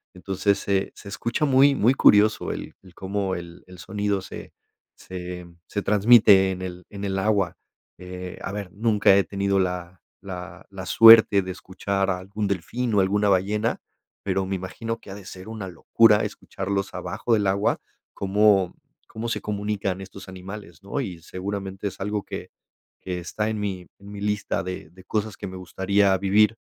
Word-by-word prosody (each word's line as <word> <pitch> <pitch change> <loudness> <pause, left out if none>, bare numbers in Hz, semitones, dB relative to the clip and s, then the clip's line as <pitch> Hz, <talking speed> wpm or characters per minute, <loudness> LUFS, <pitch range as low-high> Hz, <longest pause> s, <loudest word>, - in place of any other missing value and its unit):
entonces, 95 +2 0
se 100 -1 0
se 100 - -11
escucha 120 +8 -1
muy 140 +1 +5
muy 120 +2 +4
curioso 105 -2 +4
el - - -7
el 90 -2 -16
cómo 95 0 -2
el 85 0 -9
el 90 0 -13
sonido 100 +1 -2
se - - -9 0.4
se 90 -1 -7 0.2
se 100 - -3
transmite 105 -2 +6
en 95 0 -5
el 90 -1 -7
en 100 0 -8
el 95 0 -1
agua, 100 -3 +1 0.4
eh, 90 0 -8
a - - -3
ver, 100 -4 -5
nunca 105 -2 +4
he 100 - +4
tenido 100 0 0
la 90 0 -3 0.2
la 90 -1 -8
la 95 -1 -7
suerte 115 -3 +8
de 95 - -5
escuchar 95 +1 -2
a 90 - 0
algún 100 +3 -4
delfín 110 +6 -2
o 100 - +5
alguna 105 +2 +2
ballena, 105 +4 +1 0.4
pero 95 -1 0
me 95 - -1
imagino 115 +5 -5
que 95 - -12
ha - - -7
de 100 - -11
ser 95 +3 -10
una 105 -4 -6
locura 105 +5 +4
escucharlos 100 0 -4
abajo 120 - -2
del 105 -2 +2
agua, 100 +2 +1 0.4
cómo 100 -1 +3 0.3
cómo 115 +2 -5
se - - -2
comunican 100 -2 -2
estos 95 0 -10
animales, 95 -1 -9
¿no?, 140 +8 -3
y 90 -8 -6
seguramente 95 +2 -5
es - - -15
algo 105 0 -2
que - - -7 0.5
que 90 -1 -4
está 105 +5 -3
en 110 -1 -3
mi 95 -3 -3
en 100 +1 -12
mi 100 -1 -8
lista 105 -1 -1
de 90 -3 -6
de 95 +1 -16
cosas 110 0 -2
que - - -6
me 95 0 -8
gustaría 95 +1 +1
vivir, 105 +3 +3
100 Hz, 180 wpm, -24 LUFS, 95-105 Hz, 0.5 s, suerte